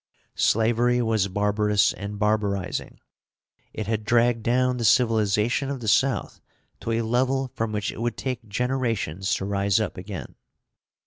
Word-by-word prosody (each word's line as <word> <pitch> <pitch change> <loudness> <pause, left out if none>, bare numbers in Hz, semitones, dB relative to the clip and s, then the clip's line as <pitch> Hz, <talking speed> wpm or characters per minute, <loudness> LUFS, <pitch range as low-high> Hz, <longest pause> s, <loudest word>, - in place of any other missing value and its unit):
Slavery 120 +2 +3
was 110 -4 +1
barbarous 105 +1 +2
and 100 +2 -6
barbarizing. 105 -3 -1 0.7
It 110 - -5
had 110 0 -2
dragged 115 +1 +2
down 125 +2 +1
the 120 - -3
civilization 115 +2 +2
of 140 -2 -3
the 115 - -6
South 130 +5 +1 0.4
to 115 - -4
a 115 +1 0
level 130 +3 0
from 115 -1 -2
which 105 -1 -2
it - - -8
would 120 0 -2
take 125 -4 -4
generations 115 - -1
to 95 - -3
rise 100 0 +1
up 110 - -3
again. 90 - -7
110 Hz, 145 wpm, -25 LUFS, 105-120 Hz, 0.7 s, Slavery